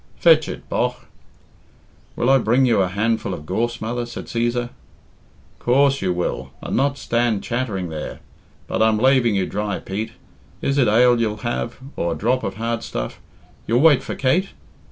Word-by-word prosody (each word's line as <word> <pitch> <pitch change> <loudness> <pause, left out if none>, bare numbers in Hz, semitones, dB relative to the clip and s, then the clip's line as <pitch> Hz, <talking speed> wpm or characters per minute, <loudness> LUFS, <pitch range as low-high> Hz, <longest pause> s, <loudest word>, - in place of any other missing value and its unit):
Fetch 160 -2 +5
it, - - -7
bogh." - - 0 1.2
"Will 120 - 0
I 135 - +6
bring 120 +3 +3
you 115 -5 +3
a 95 - +2
handful 105 0 -1
of 75 - -10
gorse, 120 +7 -1
mother?" 120 +2 -3
said 120 - -7
Cæsar. 120 +1 -1 0.9
"Coorse 135 +2 +3
you 95 - +1
will, 90 0 -2
and - - -4
not 140 +2 +1
stand 115 -5 0
chattering 110 -8 -2
there. 80 -1 -6 0.5
But - - -2
I'm 110 -1 +4
laving 125 -2 +3
you 95 -1 +1
dry, 105 0 -2
Pete. 105 +4 -5 0.5
Is 140 +1 0
it 125 - +4
ale 120 +2 +4
you'll 105 -2 0
have, 120 0 -2 0.2
or 85 -1 -1
a - - -6
drop 125 +4 +1
of - - -3
hard 115 +1 -2
stuff? - - -5 0.5
You'll 120 +3 +3
wait 155 -4 +6
for - - -5
Kate? 170 +9 +1
120 Hz, 175 wpm, -21 LUFS, 105-130 Hz, 1.2 s, I